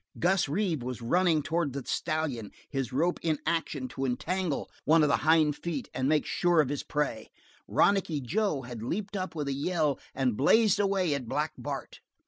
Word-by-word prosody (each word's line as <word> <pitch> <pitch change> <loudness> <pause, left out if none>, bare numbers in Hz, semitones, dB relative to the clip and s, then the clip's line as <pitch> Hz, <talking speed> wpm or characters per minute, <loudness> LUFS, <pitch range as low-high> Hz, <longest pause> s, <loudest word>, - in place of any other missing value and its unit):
Gus 180 -3 +2
Reeve 165 -3 0
was 125 -1 -5
running 165 +3 +2
towards 160 -3 -1
the 140 -1 -4
stallion, 155 -10 -2 0.2
his 135 -3 -3
rope 170 +7 +1
in 160 -2 +1
action 160 -5 -1
to 135 - -5
entangle 160 +5 -1 0.2
one 160 +1 +5
of 150 - +3
the - - +3
hindfeet 155 -1 +1
and 130 +1 0
make 155 -1 +2
sure 175 -2 +2
of 145 -4 +3
his 145 -1 -2
prey; 150 -7 -2 0.4
Ronicky 190 -6 +2
Joe 155 - -1
had 120 -2 -7
leaped 200 - -3
up 185 -3 -3
with 150 -3 -3
a 140 - 0
yell 150 0 0 0.2
and 130 -4 +1
blazed 210 - +4
away 195 -5 +2
at 130 -5 -4
Black 150 +1 0
Bart. 140 -2 -6
155 Hz, 180 wpm, -29 LUFS, 135-175 Hz, 0.4 s, one